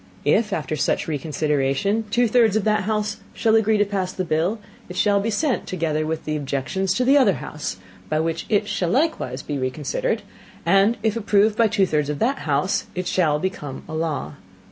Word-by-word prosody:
If 210 Hz, +9 st, +3 dB
after 155 Hz, -3 st, -2 dB
such 145 Hz, -, 0 dB
Reconsideration 150 Hz, +6 st, 0 dB
two 240 Hz, +3 st, +3 dB
thirds 225 Hz, -2 st, +3 dB
of 220 Hz, -, +1 dB
that 215 Hz, -2 st, +1 dB
house 210 Hz, -1 st, -1 dB, 0.2 s
shall 225 Hz, -1 st, +3 dB
agree 220 Hz, -1 st, +3 dB
to 205 Hz, -, +3 dB
pass 195 Hz, -2 st, -2 dB
the 185 Hz, -, -3 dB
Bill, 170 Hz, +7 st, 0 dB, 0.3 s
it 180 Hz, -, -7 dB
shall 200 Hz, +1 st, +3 dB
be 210 Hz, +3 st, -1 dB
sent, 255 Hz, +4 st, 0 dB
together 155 Hz, -3 st, -1 dB
with 160 Hz, 0 st, -3 dB
the 155 Hz, -, -1 dB
Objections, 145 Hz, +6 st, -2 dB
to 250 Hz, -, +1 dB
the 280 Hz, +3 st, +6 dB
other 220 Hz, -8 st, +4 dB
House, 150 Hz, -, -5 dB, 0.3 s
by 155 Hz, -, +1 dB
which 165 Hz, 0 st, -2 dB
it 210 Hz, -1 st, +2 dB
shall 180 Hz, -4 st, -1 dB
likewise 230 Hz, -, 0 dB
be 145 Hz, -2 st, -3 dB
reconsidered, 155 Hz, -, -2 dB, 0.4 s
and 195 Hz, +4 st, +4 dB
if 220 Hz, -1 st, +1 dB
approved 215 Hz, -1 st, +3 dB
by 230 Hz, 0 st, +4 dB
two 205 Hz, -2 st, +2 dB
thirds 150 Hz, -4 st, 0 dB
of 150 Hz, -, -2 dB
that 265 Hz, -, 0 dB
House, 150 Hz, +8 st, +1 dB
it 180 Hz, 0 st, -2 dB
shall 160 Hz, -6 st, +2 dB
become 150 Hz, -5 st, -4 dB
a 160 Hz, -, -8 dB
law. 155 Hz, -3 st, -2 dB
190 Hz, 195 wpm, -22 LUFS, 155-215 Hz, 0.4 s, the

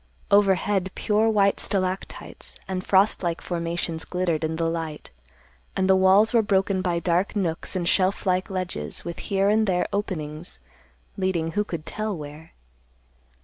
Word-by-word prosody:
Overhead, 195 Hz, -1 st, +3 dB
pure 215 Hz, +1 st, +2 dB
white 200 Hz, -2 st, +3 dB
stalactites 185 Hz, -1 st, -3 dB
and 185 Hz, -1 st, -3 dB
frost 195 Hz, +2 st, +3 dB
like 170 Hz, -2 st, -1 dB
formations 170 Hz, -1 st, -3 dB
glittered 175 Hz, -3 st, -1 dB
in 160 Hz, 0 st, -1 dB
the 165 Hz, 0 st, 0 dB
light, 165 Hz, -2 st, -4 dB, 0.6 s
and 190 Hz, -, +1 dB
the 190 Hz, -, +5 dB
walls 190 Hz, +4 st, +5 dB
were 230 Hz, -, +5 dB
broken 195 Hz, -2 st, +1 dB
by 175 Hz, -2 st, 0 dB
dark 175 Hz, +4 st, 0 dB
nooks 175 Hz, -2 st, -2 dB
and 175 Hz, -2 st, -1 dB
shelf 190 Hz, +3 st, +2 dB
like 185 Hz, +1 st, +1 dB
ledges 185 Hz, -1 st, -4 dB
with 170 Hz, -1 st, -5 dB
here 195 Hz, 0 st, 0 dB
and 215 Hz, +1 st, +3 dB
there 180 Hz, -2 st, +1 dB
openings 160 Hz, -, -4 dB, 0.6 s
leading 180 Hz, -4 st, 0 dB
who 210 Hz, +4 st, 0 dB
could 170 Hz, -6 st, -6 dB
tell 215 Hz, -3 st, -3 dB
where? 150 Hz, +2 st, -10 dB
185 Hz, 150 wpm, -25 LUFS, 170-200 Hz, 0.6 s, the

